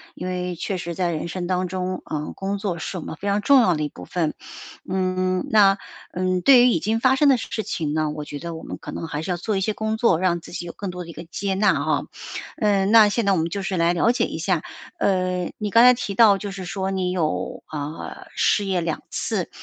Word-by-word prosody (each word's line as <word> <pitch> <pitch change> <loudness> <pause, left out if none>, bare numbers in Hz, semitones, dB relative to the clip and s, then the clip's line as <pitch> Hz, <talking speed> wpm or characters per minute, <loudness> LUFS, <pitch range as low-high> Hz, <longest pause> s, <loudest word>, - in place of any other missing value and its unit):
因 180 - -5
为 180 -1 -3
确 190 +3 -3
实 170 -1 -5
在 180 -1 0
人 160 +2 -4
生 175 +1 -4
当 185 0 0
中， 185 0 -3
呃， 150 -1 -4
工 195 +1 -2
作 195 -4 -3
是 175 +3 -5
我 170 - -5
们 - - -6
非 200 - -6
常 200 +1 +2
重 275 +4 +6
要 185 -6 +3
的 155 - -2
一 150 - 0
部 90 - -11
分。 160 - -1 0.5
嗯， 185 +2 0
那， 205 -4 +5 0.4
嗯， 185 0 0
对 250 +2 +7
于 - - +6
已 200 - +2
经 220 +6 0
发 260 +2 +4
生 290 +1 +4
的 265 - +5
事 225 -1 -4
情 150 -6 -3
呢 155 -1 0
我 150 0 -5
觉 145 -1 -6
得 170 +2 -6
我 160 - -9
们 - - -6
可 - - -8
能 165 - -5
还 150 -1 -4
是 180 - -3
要 175 - -1
做 210 +4 -2
一 - - -1
些 215 +3 0
工 220 +1 -2
作， 220 -7 +3
让 175 -2 +1
自 - - -12
己 175 - -5
有 170 - -7
更 200 - -5
多 180 0 -6
的 170 - -12
一 - - -8
个 - - -8
接 190 +4 -3
纳 200 +2 +3
啊。 155 +2 +1 0.6
嗯， 200 -2 +2
那 220 -2 +8
现 215 +2 0
在 200 - +3
我 190 - +3
们 160 - 0
就 200 +3 -3
是 190 -1 -2
来 170 +1 +3
了 200 +7 +3
解 245 - +1
一 - - -5
下， - - 0 0.4
呃， 185 -2 0
你 210 - -3
刚 230 - +7
才 250 - +9
提 200 -5 -4
到 210 -3 +6
就 205 0 -6
是 190 -2 -7
说 190 +1 -3
你 185 -1 -1
有， 170 -4 -2
啊， 150 +1 -6
失 205 - +2
业 185 -3 0
2 165 -1 -2
次， - - -2
185 Hz, 280 characters per minute, -23 LUFS, 170-205 Hz, 0.6 s, 才